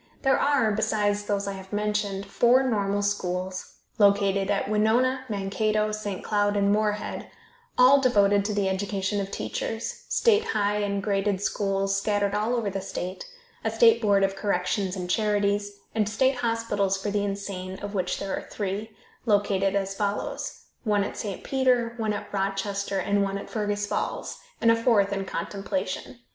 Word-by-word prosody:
There 270 -1 +4
are, 280 -7 +3
besides 205 -1 0
those 200 -1 -1
I - - -1
have 190 -1 -9
mentioned, 205 -1 -1
four 240 +6 +4
normal 205 -5 0
schools 185 -2 -2 0.3
(located 200 -1 +3
at 200 -1 0
Winona, 240 +5 +2
Mankato, 215 +1 0
St. 210 -3 -4
Cloud 205 -1 +1
and 200 0 +3
Moorhead), 210 0 -1 0.5
all 265 +2 +7
devoted 205 -5 +4
to 210 - -1
the 200 -1 +1
education 200 +1 -1
of 195 - -4
teachers, 225 +3 -4
state 445 -2 +4
high 210 - 0
and 200 -1 -1
graded 200 -1 0
schools 195 -1 0
scattered 205 0 0
all 215 +4 +1
over 220 -4 -1
the 195 0 -3
state, 185 0 -5 0.4
a - - +1
state 460 -2 +5
board 200 -3 +3
of 195 0 +1
corrections 195 -1 -1
and 180 -2 -4
charities, 205 +1 +1 0.2
and 215 -2 +1
state 260 +4 +2
hospitals 230 -5 0
for 205 +1 -3
the 205 0 0
insane 195 -2 -4
(of 205 +1 -6
which 185 -3 -1
there 195 -1 -3
are - - -7
three), 205 +2 -3 0.4
located 200 -2 +2
as 195 -1 0
follows: 205 +1 -3 0.2
One 210 -3 +2
at - - -5
St. 200 -3 -5
Peter, 250 -3 +2
one 220 -2 0
at 205 0 -6
Rochester, 195 0 -1
and 200 +2 +1
one 195 0 -1
at 200 - -8
Fergus 205 -1 -1
Falls, - - -3 0.2
and 230 - +5
a - - +5
fourth 225 -4 +3
in 195 -1 -2
contemplation. 185 - -4
205 Hz, 165 wpm, -26 LUFS, 195-215 Hz, 0.5 s, all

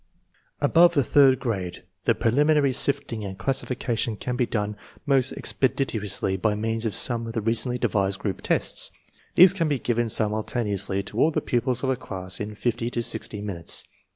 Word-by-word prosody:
Above 170 +4 +5
the 140 - +3
third 135 -1 +4
grade 95 -9 -4 0.2
the - - +3
prelimi 145 +7 +2
nary 140 -3 +2
sifting 120 -4 -1
and 95 -1 -6
classification 120 0 -1
can 125 +3 -3
be 125 -1 0
done 105 -1 -2 0.3
most 135 -3 +2
expe 130 - -1
ditiously 105 -7 -2
by 110 -2 +1
means 115 +1 -2
of 105 - -4
some 115 -2 +1
of 115 - -6
the 115 - -2
recently 115 +3 0
devised 95 -4 0
group 100 -4 -4
tests. - - 0 0.5
These 185 +1 +8
can 170 -4 0
be 145 -2 0
given 120 -1 -1
simultaneously 105 -2 0
to 110 - -6
all 155 - +5
the 160 - -1
pupils 125 +1 -1
of 130 - +1
a - - +1
class 95 -6 -3
in 105 0 -5
fifty 120 +1 -2
to 120 -1 -3
sixty 105 -2 -1
minutes. 90 -5 -1
115 Hz, 180 wpm, -25 LUFS, 105-130 Hz, 0.5 s, These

